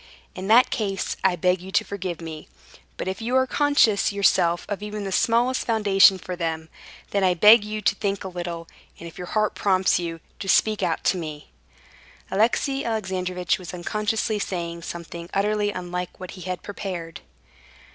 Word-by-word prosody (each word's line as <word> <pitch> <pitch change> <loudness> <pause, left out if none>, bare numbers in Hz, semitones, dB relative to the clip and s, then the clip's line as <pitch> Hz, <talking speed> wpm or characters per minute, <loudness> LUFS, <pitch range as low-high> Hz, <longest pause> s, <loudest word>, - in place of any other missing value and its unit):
In 185 +1 -6
that 230 +4 +6
case, 195 -3 -2
I 190 -2 +3
beg 180 +1 +1
you 190 +1 -9
to - - +3
forgive 185 -4 -5
me. 160 -2 -8 0.5
But - - -4
if 190 +3 -3
you 240 +3 -1
are 260 0 +4
conscious 260 -8 +3
yourself 175 -4 +2
of 205 -1 -4
even 210 0 -5
the 195 - -4
smallest 240 +6 +2
foundation 200 -4 +5
for 180 0 -6
them, 160 -2 -3 0.4
then 200 -1 +1
I 180 -1 +3
beg 210 +5 +7
you 215 0 -4
to - - +3
think 200 -1 -2
a - - -5
little, 175 -2 -5 0.3
and 170 - -9
if 165 - -12
your 180 - -6
heart 215 +2 0
prompts 190 -2 +2
you, 165 -1 -4 0.2
to 195 - -5
speak 215 +2 +3
out - - -1
to 185 - +2
me...." 155 -3 -7 0.8
Alexey 255 +7 +1
Alexandrovitch 185 -5 -1
was 180 0 -7
unconsciously 215 +4 -1
saying 170 -3 -4
something 170 0 -7
utterly 210 +1 +1
unlike 180 -2 -5
what 185 -1 -7
he 185 - -10
had 180 - -4
prepared. 185 -5 -6
190 Hz, 175 wpm, -24 LUFS, 175-210 Hz, 0.8 s, beg